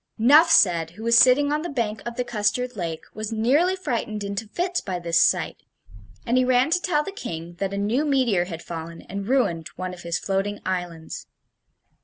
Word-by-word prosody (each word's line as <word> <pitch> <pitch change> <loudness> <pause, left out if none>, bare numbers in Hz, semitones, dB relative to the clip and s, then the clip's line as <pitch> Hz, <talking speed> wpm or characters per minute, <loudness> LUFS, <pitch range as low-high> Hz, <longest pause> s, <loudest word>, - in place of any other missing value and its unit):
Nuphsed, 220 - +5
who 220 - -9
was 230 0 +3
sitting 265 +4 +5
on 300 - 0
the 345 - -5
bank 225 -6 -2
of 235 - -5
the 250 - -1
custard 240 +2 -1
lake, 165 -5 -4
was 215 +1 -5
nearly 275 +12 +2
frightened 230 - -3
into 200 +2 -4
fits 355 - -2
by 185 -2 -4
this 170 -1 +1
sight; - - +1 0.7
and 245 +2 +2
he - - +3
ran 255 +3 +2
to 355 +1 +2
tell 300 -5 +1
the 395 - -6
King 170 - -7
that 195 -1 -2
a 200 - -4
new 215 +8 0
meteor 255 -11 +1
had 170 -2 -8
fallen 165 0 -7
and 200 +1 -6
ruined 200 - +1
one 185 0 -5
of 180 - -11
his 170 -1 -2
floating 195 +1 -2
islands. 175 -3 -5
215 Hz, 195 wpm, -24 LUFS, 180-255 Hz, 0.7 s, Nuphsed